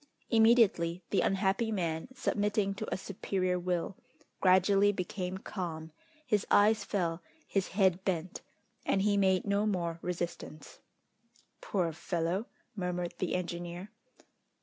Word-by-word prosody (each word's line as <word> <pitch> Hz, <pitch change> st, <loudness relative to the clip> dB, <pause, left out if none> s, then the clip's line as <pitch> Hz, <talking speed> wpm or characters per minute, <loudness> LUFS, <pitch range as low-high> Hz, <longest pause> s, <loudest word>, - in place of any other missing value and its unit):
Immediately 220 Hz, -7 st, +4 dB
the 200 Hz, -, +3 dB
unhappy 195 Hz, +3 st, +1 dB
man, 165 Hz, -4 st, -2 dB
submitting 205 Hz, -4 st, 0 dB
to 210 Hz, +2 st, -6 dB
a -, -, 0 dB
superior 185 Hz, -1 st, -2 dB
will, 180 Hz, +1 st, -2 dB, 0.4 s
gradually 195 Hz, +2 st, +5 dB
became 185 Hz, -1 st, -4 dB
calm, 165 Hz, -5 st, -5 dB, 0.3 s
his 210 Hz, -6 st, +1 dB
eyes 210 Hz, +2 st, +5 dB
fell, 170 Hz, -4 st, -1 dB, 0.3 s
his 195 Hz, -2 st, 0 dB
head 190 Hz, -2 st, +2 dB
bent, 180 Hz, -2 st, -2 dB, 0.4 s
and 195 Hz, -, +1 dB
he 205 Hz, 0 st, +3 dB
made 190 Hz, -2 st, +3 dB
no 200 Hz, +1 st, +1 dB
more 170 Hz, -4 st, -1 dB
resistance. 175 Hz, -3 st, -5 dB, 0.8 s
"Poor 175 Hz, -5 st, -1 dB
fellow!" 175 Hz, +5 st, -2 dB, 0.3 s
murmured 180 Hz, -2 st, -2 dB
the 185 Hz, -, -1 dB
engineer. 175 Hz, +1 st, -5 dB
185 Hz, 120 wpm, -31 LUFS, 175-200 Hz, 0.8 s, gradually